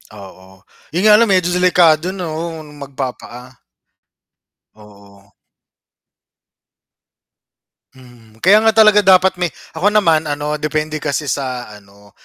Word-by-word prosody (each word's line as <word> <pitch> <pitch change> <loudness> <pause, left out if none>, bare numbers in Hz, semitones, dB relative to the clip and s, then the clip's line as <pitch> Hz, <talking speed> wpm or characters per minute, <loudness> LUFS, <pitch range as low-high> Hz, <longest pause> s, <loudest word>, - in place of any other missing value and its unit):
Oo, 95 -1 -15 0.3
yun 180 - -1
nga 210 0 +6
lang 230 - +3
medyo 185 -3 +1
delikado 180 -1 +2
'no, 165 -2 -6 0.2
magpa-paa. 130 -2 -9 1.2
Oo. 100 -1 -20 2.6
Mhm, 120 -4 -20
kaya 200 +4 +5
nga 220 -1 +1
talaga 215 -1 +5
dapat 190 -1 +3
may 175 - 0 0.2
ako 160 +5 -2
naman 165 -7 +1
ano 150 +1 -4
depende 155 0 -3
kasi 145 +1 -3
sa 130 -4 -5
ano 100 0 -18
150 Hz, 110 wpm, -16 LUFS, 120-180 Hz, 2.6 s, nga